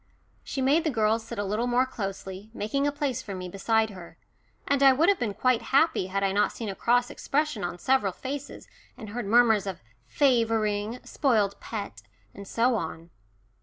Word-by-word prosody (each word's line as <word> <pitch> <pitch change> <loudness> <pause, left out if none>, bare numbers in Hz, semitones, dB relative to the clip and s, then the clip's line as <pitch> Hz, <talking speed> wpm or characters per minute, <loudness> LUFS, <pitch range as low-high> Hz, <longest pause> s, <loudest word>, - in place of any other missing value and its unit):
She 270 - -3
made 290 +5 +3
the 320 - +1
girls 225 -3 +1
sit 225 - -8
a 205 - -1
little 210 +5 -1
more 245 +1 +3
closely, 195 -4 -6
making 275 +7 -1
a - - +1
place 280 -4 -2
for 200 -5 -7
me 180 -1 -6
beside 220 +4 +1
her, 170 -4 -12 0.5
and 280 -1 +1
I 270 -1 +7
would 315 +8 +3
have 400 - +3
been 210 -4 -2
quite 255 -2 +2
happy 270 - +2
had 195 +1 -2
I 195 - +2
not 205 +2 +2
seen 225 -3 -5
a 195 - -5
cross 245 +3 +2
expression 295 -7 -1
on 175 0 -3
several 235 -1 +2
faces, 275 +7 -7 0.3
and 220 -4 -9
heard 230 0 -4
murmurs 225 -2 +4
of 190 -8 -6 0.2
"favouring," 225 - +1
"spoilt 215 -8 +1
pet," 200 - -6 0.3
and 200 - -10
so 240 +4 +2
on. 165 -4 -4
225 Hz, 190 wpm, -27 LUFS, 200-260 Hz, 0.5 s, I